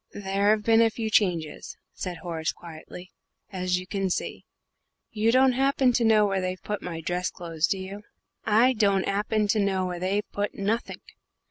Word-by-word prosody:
"There 200 0 0
have 215 0 +3
been 225 +1 +5
a 230 - +5
few 220 0 -4
changes," 175 -8 0 0.2
said 180 -2 -5
Horace, 165 -3 -2
quietly, 170 +2 -11 0.4
"as 185 -1 -1
you 180 - -6
can 195 0 -2
see. - - -3 0.7
You 220 +1 +2
don't 260 +1 +5
happen 265 0 +2
to 240 - +2
know 220 -2 +5
where 195 -2 0
they've 185 0 -4
put 210 0 -3
my 165 -2 -5
dress 180 +2 -2
clothes, 165 -2 -2
do 195 - 0
you?" 190 +2 -7 0.4
"I 230 +4 +4
don't 200 -4 +2
'appen 210 +1 0
to 215 - +2
know 190 -2 +1
where 180 -1 -4
they've 195 +3 -1
put 205 0 -3
nothink. 215 +4 -2
200 Hz, 180 wpm, -26 LUFS, 180-215 Hz, 0.7 s, been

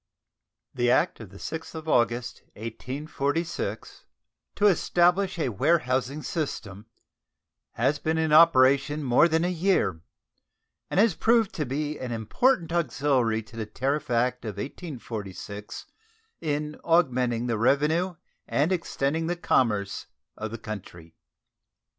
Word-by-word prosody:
The 120 -1 +1
act 150 +8 +2
of 110 -5 -9
the 100 - -13
6th 160 +8 -6
of 160 0 -7
August, 120 -3 +1
1846, 140 +8 -4 0.5
"to 210 - +1
establish 180 0 +3
a 155 - 0
warehousing 135 - 0
system," 110 - -4 0.9
has 145 +1 +1
been 160 +1 -1
in 160 -1 +1
operation 145 -2 +5
more 130 +5 +5
than 165 +1 +1
a 180 - 0
year, 170 - +1 0.9
and - - 0
has 220 -2 +5
proved 225 +3 +2
to 150 -4 -3
be 150 +3 -3
an 125 -1 -5
important 165 - +1
auxiliary 130 -7 +1
to 110 - -16
the 110 -2 -4
tariff 135 +7 -2
act 125 +1 +1
of 105 -4 -6
1846 105 - -7 0.5
in 150 -1 -3
augmenting 125 -8 +2
the 115 -3 -1
revenue 155 +9 +2 0.3
and 150 +6 +1
extending 160 -3 -1
the 175 - 0
commerce 105 - 0 0.3
of 110 - -5
the 115 - -6
country. 90 -7 -9
140 Hz, 125 wpm, -26 LUFS, 115-165 Hz, 0.9 s, operation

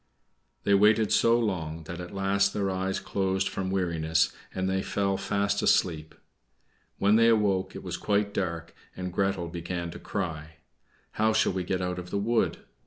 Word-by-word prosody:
They 100 - +3
waited 105 +2 +4
so 115 +1 +4
long, 80 -8 -2
that 85 +2 -7
at 90 - -8
last 100 0 +1
their 100 -2 0
eyes 95 +1 -1
closed 95 -1 -1
from 95 -1 -3
weariness, 85 -4 +1 0.2
and 95 0 -2
they 95 0 0
fell 100 0 0
fast 100 +1 0
asleep. 80 -3 +1 0.8
When 100 +2 +4
they 115 0 +5
awoke 100 -4 +2
it - - -7
was - - -4
quite 100 0 0
dark, 85 -4 -3 0.2
and 90 -1 -4
Gretel 95 -2 0
began 85 0 -4
to - - -9
cry, 80 -5 -4 0.6
"How 110 0 +1
shall 110 -3 +2
we 95 -1 -2
get 90 +1 -2
out 90 0 -2
of 90 0 -8
the 100 - -2
wood?" 115 +3 0
95 Hz, 175 wpm, -28 LUFS, 90-100 Hz, 0.8 s, they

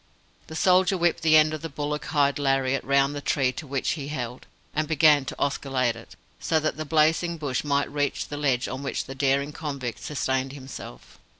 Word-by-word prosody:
The 160 - -8
soldier 185 +2 +4
whipped 175 -1 +1
the 155 -1 +6
end 155 0 +4
of 155 - -4
the 165 - -5
bullock 150 +1 -3
hide 145 -1 +1
lariat 135 -1 +1
round 140 +1 +2
the 145 - -5
tree 135 -3 +1
to 145 +4 -8
which 135 -1 -1
he 145 -4 -4
held, 125 -4 -5 0.3
and 155 0 0
began 150 -3 +5
to - - -5
oscillate 135 -4 0
it, 115 - -13 0.2
so 160 - +1
that 155 0 -1
the 155 - -5
blazing 160 +3 +2
bush 140 -5 -2
might 140 -1 0
reach 145 -1 -1
the 145 - -6
ledge 135 -4 +1
on 130 +1 -5
which 140 - -3
the 135 - -7
daring 140 +2 +1
convict 140 -7 -5
sustained 130 -2 -2
himself. 130 - -10
145 Hz, 200 wpm, -25 LUFS, 135-155 Hz, 0.3 s, the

